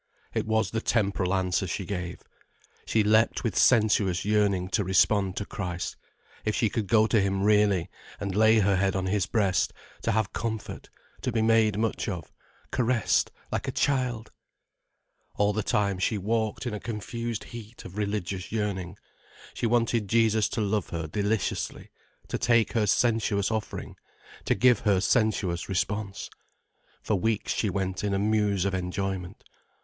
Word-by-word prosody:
It - - -1
was 110 -3 +1
the 110 - -1
temporal 100 -6 0
answer 95 -1 0
she 95 +3 -3
gave. 90 -2 -5 0.7
She 110 - +2
leapt 110 +2 +3
with 115 -6 -1
sensuous 105 -6 +3
yearning 100 -3 +1
to 105 +1 +1
respond 95 +1 +2
to 100 - -2
Christ. 90 -3 -4 0.5
If 110 - 0
she 110 - +1
could 110 -4 -2
go 110 0 +5
to 110 -1 +3
him 95 0 0
really, 105 -4 +3 0.3
and 100 -2 -3
lay 110 +1 +5
her 100 -1 +3
head 95 +1 +1
on 95 -1 -1
his 95 -1 0
breast, 100 -6 +1 0.3
to 115 - 0
have 110 -2 0
comfort, 110 -2 -4 0.3
to 125 - -1
be 110 -1 +1
made 110 -2 +3
much 110 0 -1
of, 85 -7 -6 0.4
caressed 120 -3 +2 0.2
like - - -2
a - - 0
child! 125 -5 0 1.0
All 105 0 +2
the 110 - 0
time 100 -2 0
she 105 +3 +1
walked 110 +4 -1
in 120 - -2
a 105 - -4
confused 115 +1 -4
heat 115 0 -10
of 95 - -9
religious 100 -3 -3
yearning. 100 -4 -3 0.6
She 120 - -1
wanted 115 -2 +1
Jesus 110 -1 +3
to 110 - -2
love 105 -2 -1
her 85 -1 -3
deliciously, 100 +6 -2 0.4
to - - -3
take 115 -2 +3
her 110 -3 +2
sensuous 110 -2 +2
offering, 110 -1 -4 0.5
to - - +2
give 125 +4 +4
her 100 -3 +2
sensuous 100 -5 +1
response. 100 +1 -2 0.8
For - - -1
weeks 105 +2 0
she 105 - 0
went 95 0 -2
in 100 -1 0
a - - +1
muse 105 -2 +1
of 100 - 0
enjoyment. 95 0 -3
105 Hz, 160 wpm, -27 LUFS, 95-110 Hz, 1.0 s, go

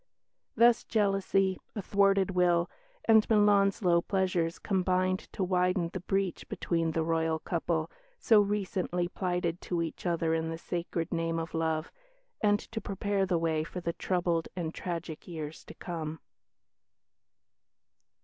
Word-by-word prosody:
Thus 235 -1 +5
jealousy, 195 -3 +1 0.2
a 210 - -2
thwarted 195 -1 +3
will, 175 -1 +2 0.3
and 220 -1 +5
Milan's 205 -2 +4
low 170 -1 +4
pleasures 185 -3 0
combined 185 -1 +1
to 195 - -1
widen 180 -1 +1
the 185 - -3
breach 195 0 -2
between 165 -2 -1
the 160 - +1
Royal 160 0 +1
couple, 165 -1 -2 0.3
so 220 - +5
recently 190 -3 -1
plighted 175 -2 -2
to 170 -2 -1
each 165 +2 -5
other 165 -1 +1
in 160 0 -1
the 165 - -4
sacred 170 0 -3
name 165 0 -1
of 165 0 -4
love, 160 -1 -1 0.5
and 205 -1 +3
to 225 -1 -4
prepare 200 0 -1
the 180 -2 +2
way 160 -1 0
for 175 +3 -6
the 170 -1 -2
troubled 175 -3 0
and 170 -3 -3
tragic 170 -3 -5
years 160 -3 -6
to - - -11
come. 160 -3 -5
180 Hz, 140 wpm, -30 LUFS, 165-195 Hz, 0.5 s, Thus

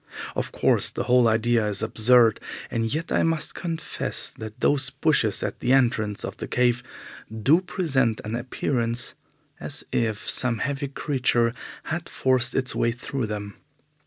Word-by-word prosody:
Of - - -2
course, - - +2
the - - -3
whole 125 -1 +4
idea 115 +1 +2
is 100 -2 -1
absurd, 115 -1 +4 0.3
and 115 -1 -1
yet 160 +4 -2
I - - +3
must 165 -1 0
confess 165 -2 -3
that 110 +2 -9
those 135 +1 +2
bushes 135 -6 +2
at - - -4
the 125 +1 +2
entrance 115 -6 +1
of - - -7
the - - -5
cave 125 -1 +2 0.5
do 135 - +3
present 135 - 0
an 110 +2 -3
appearance 120 -1 0 0.5
as - - -3
if 110 -3 -1
some 125 -3 +1
heavy 140 +4 -2
creature 125 -4 0 0.3
had 165 +1 -4
forced 130 -1 +1
its 130 -2 0
way 115 - +1
through 125 0 -4
them. 105 -1 -6
125 Hz, 155 wpm, -25 LUFS, 115-135 Hz, 0.5 s, whole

